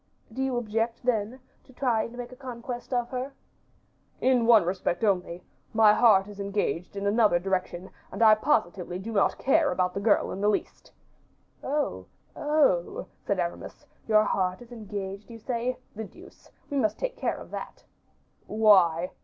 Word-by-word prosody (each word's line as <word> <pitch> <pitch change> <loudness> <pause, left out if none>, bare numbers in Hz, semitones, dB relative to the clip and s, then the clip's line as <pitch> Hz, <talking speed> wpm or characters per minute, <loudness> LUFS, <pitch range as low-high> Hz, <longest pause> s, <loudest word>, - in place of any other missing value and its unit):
"Do 265 - -4
you 265 -2 0
object, 225 +1 -2
then, 240 +1 -1 0.2
to 260 - -19
try 245 -4 +1
and 235 +2 -6
make 245 0 -7
a - - -10
conquest 245 -1 -7
of 245 -2 0
her?" 260 +2 -4 0.9
"In 250 -3 +3
one 225 -6 +7
respect 180 +1 -2
only; 180 -4 0 0.3
my 215 -1 +7
heart 210 -4 +5
is 205 -1 -11
engaged 200 -3 -2
in 200 0 -4
another 205 -3 +4
direction, 185 0 -3 0.2
and - - -1
I 220 -1 +8
positively 190 - 0
do 200 +5 -6
not 205 -3 +2
care 295 +2 +2
about 180 -1 0
the 195 - -3
girl 205 +1 +2
in 195 - -5
the 205 - +3
least." 210 - -3 0.7
"Oh, 290 +2 -2 0.3
oh!" 295 - +1 0.2
said 200 -2 0
Aramis, 175 -1 -5 0.2
"your 215 -1 +5
heart 185 -3 -1
is 240 - -19
engaged, 205 -2 -6
you 230 - -9
say. 245 +2 -2 0.2
The 220 +1 -5
deuce! 360 - -16 0.2
we 285 - -1
must 215 -5 +1
take - - -3
care - - -2
of - - -11
that." - - -8 0.6
"Why?" 185 -6 +4
215 Hz, 170 wpm, -27 LUFS, 195-245 Hz, 0.9 s, I